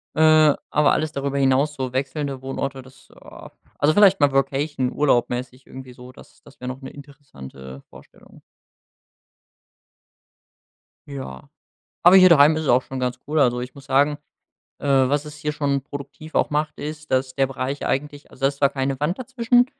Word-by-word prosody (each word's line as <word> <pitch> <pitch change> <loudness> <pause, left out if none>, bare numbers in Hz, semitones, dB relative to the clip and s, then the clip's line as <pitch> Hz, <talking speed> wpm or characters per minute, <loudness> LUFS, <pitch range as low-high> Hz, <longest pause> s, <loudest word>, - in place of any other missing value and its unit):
Äh, 155 -1 +5 0.2
aber 150 0 +3
alles 155 0 -1
darüber 140 -1 -3
hinaus, 135 +2 +2
so 130 -2 -4
wechselnde 135 0 -3
Wohnorte, 135 0 -4
das, 130 +1 -19
ah - - -13 0.3
also 150 +2 +2
vielleicht 195 -3 +5
mal 145 -1 +3
Workation, 135 -1 -1
urlaubmäßig 125 -2 -1
irgendwie 130 -1 -11
so, 125 +1 -13
das - - -18
das - - -19
wär 125 - -7
noch 130 +1 -6
'ne 135 - -8
interessante 70 - -12
Vorstellung. - - -18 2.7
Ja. 100 - -8 0.6
Aber 175 +2 +8
hier 185 -1 +8
daheim 155 -1 +6
ist 160 - -3
es - - -4
auch 125 +1 +4
schon 135 -1 -7
ganz 125 0 -3
cool. 155 +1 0
Also 125 -3 +2
ich 125 +1 -7
muss 140 -1 -14
sagen, 145 +2 +2 0.6
äh, 145 - -5
was 140 +2 +2
es 150 0 -10
hier 150 0 -3
schon 140 -2 -1
produktiv 145 +3 -10
auch - - +2
macht, 150 +1 -2
ist, 150 0 -7
dass 130 0 0
der 135 -1 +1
Bereich 135 +2 -4
eigentlich 145 +1 -3
also - - -18
da 135 - +4
ist 140 0 -5
zwar 140 -1 +3
keine 135 -1 -3
Wand 160 +5 -1
dazwischen, 245 -1 +2
140 Hz, 175 wpm, -22 LUFS, 130-150 Hz, 2.7 s, Aber